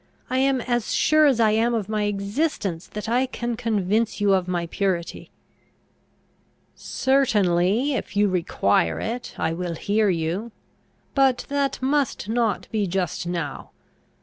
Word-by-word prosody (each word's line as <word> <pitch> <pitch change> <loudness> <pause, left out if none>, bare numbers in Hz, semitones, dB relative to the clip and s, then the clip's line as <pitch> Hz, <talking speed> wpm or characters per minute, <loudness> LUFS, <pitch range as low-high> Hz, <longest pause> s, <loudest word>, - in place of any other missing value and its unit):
I 255 - +1
am 270 -1 +2
as 240 -2 -1
sure 310 -1 +4
as 260 -5 +2
I 220 -2 +4
am 230 +2 +2
of 210 -4 -2
my 215 -1 -1
existence, 200 - -2
that 210 +1 -6
I 250 +3 +2
can 240 -2 -3
convince 220 -1 0
you 205 -1 +3
of 185 -2 +1
my 175 -1 -1
purity." 175 -1 -2 1.4
"Certainly, 220 -2 +1
if 215 -4 -4
you 205 0 +4
require 100 - +1
it, 240 +2 -5
I 160 - 0
will 175 0 -3
hear 205 +5 +1
you. 175 +6 -2 0.6
But 265 -3 +2
that 280 -1 0
must 275 -6 0
not 225 -2 0
be 210 -3 0
just 180 -1 -2
now. 170 -6 -4
210 Hz, 145 wpm, -24 LUFS, 180-245 Hz, 1.4 s, sure